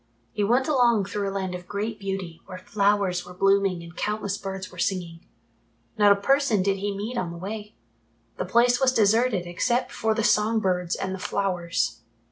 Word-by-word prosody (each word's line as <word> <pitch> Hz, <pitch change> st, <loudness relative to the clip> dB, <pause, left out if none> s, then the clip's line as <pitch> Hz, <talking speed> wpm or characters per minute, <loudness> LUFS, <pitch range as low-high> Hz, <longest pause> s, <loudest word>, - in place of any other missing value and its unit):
He 205 Hz, -, -1 dB
went 245 Hz, +6 st, +2 dB
along 240 Hz, -8 st, +3 dB
through 200 Hz, 0 st, -2 dB
a -, -, -5 dB
land 190 Hz, -2 st, -3 dB
of 180 Hz, 0 st, -7 dB
great 210 Hz, +2 st, -3 dB
beauty 190 Hz, -4 st, -5 dB
where 185 Hz, -, -7 dB
flowers 200 Hz, -2 st, +1 dB
were 180 Hz, 0 st, -12 dB
blooming 195 Hz, -2 st, +2 dB
and 170 Hz, 0 st, -12 dB
countless 210 Hz, 0 st, -2 dB
birds 190 Hz, -2 st, -6 dB
were -, -, -12 dB
singing. 175 Hz, -4 st, -2 dB, 0.8 s
Not 205 Hz, -2 st, +5 dB
a -, -, +7 dB
person 270 Hz, -3 st, +2 dB
did 195 Hz, 0 st, +1 dB
he 200 Hz, 0 st, -3 dB
meet 230 Hz, +4 st, -3 dB
on 180 Hz, -, -2 dB
the 170 Hz, -, -7 dB
way. 210 Hz, +3 st, -7 dB, 0.6 s
The -, -, -2 dB
place 240 Hz, +5 st, +3 dB
was 265 Hz, -1 st, +4 dB
deserted 220 Hz, -3 st, +3 dB
except 240 Hz, +9 st, 0 dB
for 220 Hz, 0 st, 0 dB
the 225 Hz, -, 0 dB
song 215 Hz, +2 st, +3 dB
birds 180 Hz, -3 st, 0 dB
and 190 Hz, 0 st, -3 dB
the 190 Hz, -, -5 dB
flowers. 170 Hz, -, -1 dB
200 Hz, 190 wpm, -25 LUFS, 185-220 Hz, 0.8 s, a